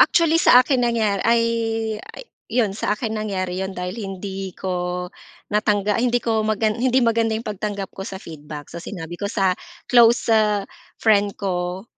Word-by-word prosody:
actually, 330 -1 +4
sa 250 +1 +7
akin 260 -2 +1
nangya 215 -4 +1
ay 230 0 +3 1.1
'yon, 225 -4 +1
sa 210 +1 -1
akin 220 -2 -3
nangyari 190 -4 -2
'yon, 190 0 -4
dahil 180 0 -3
hindi 195 -1 -6
ko 180 -1 -2 0.5
natangga 210 0 +1
ay, 245 - +2
hindi 240 - +2
ko 225 -2 0
maga 215 0 +1
hindi 255 +2 +2
maganda 225 -1 +2
yung 225 - -6
pagtanggap 205 -1 -4
ko - - -10
sa 190 - -6
feedback. 150 -4 -9
So, 170 - -6
sinabi 175 -1 -7
ko 200 - -1
sa 195 -3 +2 0.3
close 235 -1 +5 0.6
friend 205 -2 +2
ko 180 0 -3
205 Hz, 160 wpm, -22 LUFS, 190-230 Hz, 1.1 s, sa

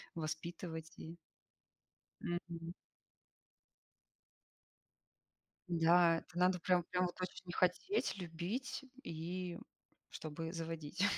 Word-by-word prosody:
воспитывать 160 0 -3
и 165 +2 -7 1.0
Мгм. 170 0 -3 2.9
Да, 170 0 +6
это 170 - -8
надо 180 0 +5
прям, 180 0 +4
прям 180 +2 +2
вот 175 - -8
очень 180 0 -4
хотеть, 185 - +2
любить, 190 - -2 0.2
и 175 +2 -3 0.5
чтобы 160 +1 -4
заводить. 165 +1 -2
170 Hz, 80 wpm, -38 LUFS, 165-180 Hz, 2.9 s, Да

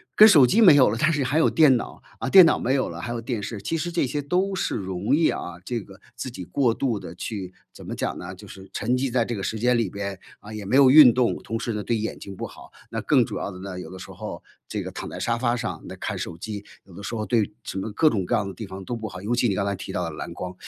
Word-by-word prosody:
跟 215 - +10
手 155 -11 +7
机 195 - +2
没 180 -9 +9
有 135 -5 +6
了， 115 - -2
但 155 +5 +3
是 145 -2 0
还 140 +4 0
有 - - +4
电 150 -5 +5
脑， - - -7 0.2
啊， - - -3
电 190 -2 +9
脑 160 - +3
没 125 - 0
有 130 - 0
了， - - -7
还 120 - -4
有 120 - -3
电 115 -1 -3
视。 105 +1 -5
其 165 - -2
实 175 +2 -3
这 170 -4 +1
些 145 +4 -2
都 180 +7 0
是 190 - -1
容 95 +3 -1
易 160 +1 +3
啊， 90 0 -5
这 120 -3 -2
个 95 0 -15 0.2
自 125 - -5
己 95 - -7
过 120 +7 +1
度 115 -4 -1
地 - - -9
去 95 -5 -5 0.2
怎 - - -12
么 - - -5
讲 - - -2
呢， - - -7
就 - - -13
是 95 0 -12
沉 120 +4 0
寂 130 0 -1
在 120 -1 +2
这 120 - -3
个 100 - -5
时 110 - -2
间 125 +2 +3
里 115 -5 0
边， 100 0 -5 0.2
啊， 105 - -12
也 105 -2 -6
没 105 - 0
有 135 -1 +7
运 145 -3 +10
动。 125 -1 +2
同 115 - -3
时 115 0 -3
呢， 105 -1 -3
对 115 +1 0
眼 110 +1 -4
睛 100 - -9
不 - - -5
好， - - -12 0.2
那 - - -3
更 - - +3
主 - - -5
要 - - -3
的 90 -2 -9
呢， 95 -1 -6
有 - - -8
的 95 - -9
时 90 - -10
候， - - -7 0.2
这 - - -4
个 - - -6
躺 - - -6
在 - - -7
沙 115 - 0
发 120 0 0
上， 120 - -4
那 - - -7
看 - - -4
手 85 - -5
机， 105 +2 -6 0.2
有 95 - -17
的 95 - -10
时 100 +3 -5
候 110 -1 -2
对 115 -3 +1
什 95 - -5
么 110 +3 -4
各 155 +7 +4
种 100 -4 0
各 120 - 0
样 105 -3 0
的 95 - -6
地 105 +3 -8
方 95 0 -8
都 120 - -3
不 110 -1 -5
好。 90 -3 -8
尤 110 +4 -1
其 120 0 +2
你 100 - 0
刚 100 - 0
才 100 - 0
提 95 - -7
到 90 - -2
的 85 - -3
蓝 75 - -7
光， 90 +1 -6
115 Hz, 335 characters per minute, -24 LUFS, 100-130 Hz, 0.2 s, 跟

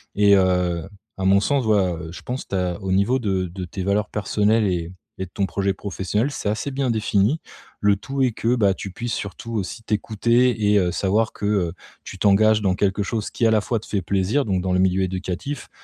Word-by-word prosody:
et 100 0 +5
heu, 90 -2 +1 0.3
à 95 - -4
mon 95 +1 +5
sens, 135 +3 +1
ouais, 100 -5 +2 0.2
je - - -9
pense 125 +2 -5
tu - - -2
as, 90 -2 -1
au 95 -1 -3
niveau 100 +7 +3
de 95 -5 0
de 90 +2 -7
tes 90 +2 -5
valeurs 100 +2 0
personnelles 105 +1 +1
et 85 -2 -2 0.3
et 95 - -1
de 90 - -17
ton 100 - 0
projet 95 +1 -1
professionnel 100 +5 -2
c'est 105 -6 -3
assez 110 +6 -2
bien 135 -2 0
défini. 110 +5 +1 0.4
Le 100 0 +4
tout 135 +6 -4
est 125 - +2
que, 115 +3 +1
bah, 100 -4 +3
tu 95 - -7
puisses 120 +5 -4
surtout 110 +3 -5
aussi 110 +1 -3
t'écouter 110 +1 +1
et - - +5
heu, 90 -2 +1
savoir 105 +5 +1
que, - - -5
heu, 95 -5 +1 0.3
tu - - -9
t'engages 105 +2 +4
dans 95 -2 +1
quelque 100 +1 0
chose, 110 +1 -3
qui 120 - 0
à - - +3
la 110 -2 +3
fois 115 +1 -1
te 110 - -13
fait 100 - -1
plaisir, 100 +9 +1
donc 95 -3 0
dans 95 0 -1
le 90 - +2
milieu 95 0 +2
éducatif, 95 +9 -4
100 Hz, 225 wpm, -22 LUFS, 95-110 Hz, 0.4 s, et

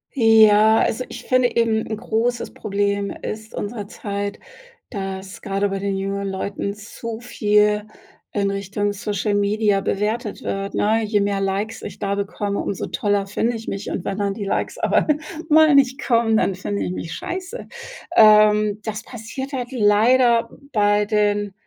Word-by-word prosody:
Ja, 220 -2 +6
also 255 - 0
ich - - -8
finde 255 -1 +2
eben 225 -1 +2
'n 220 - -4
großes 235 +2 -1
Problem 200 -1 -1
ist 215 0 -6
unserer 205 -1 -5
Zeit, 200 0 -5 0.5
dass 195 -2 -6
grade 200 0 -1
bei 195 0 -3
den 195 0 -2
jüngeren 195 0 -3
Leuten 200 +1 -3
zu 220 +2 -7
viel 210 -3 +2 0.5
in 200 -1 0
Richtung 200 +1 -2
Social 205 +1 -2
Media 205 0 +2
bewertet 210 +3 -2
wird, 195 0 -3
ne? 220 +2 +2
Je 210 -1 +1
mehr 200 -1 0
Likes 200 +3 -2
ich - - -8
da 200 0 -1
bekomme, 200 0 -3
umso 195 - -3
toller 205 -1 0
finde 230 +4 -1
ich 225 0 -8
mich 195 - -4
und 175 - -4
wenn 195 - -2
dann 200 -1 -1
die 205 0 -5
Likes 195 - -2
aber - - +1 0.4
mal 310 -1 +6
nicht 270 -1 +3
kommen, 230 -2 +3
dann 195 - +1
finde 200 +2 -3
ich - - -3
mich 165 -2 -5
scheiße. 375 - -6 0.5
Ähm, 210 -1 +6
das 215 0 -4
passiert 260 +4 -7
halt 250 -1 -4
leider 230 +1 +4 0.2
bei 205 -1 +3
den 205 -1 0
210 Hz, 160 wpm, -21 LUFS, 200-225 Hz, 0.5 s, Ja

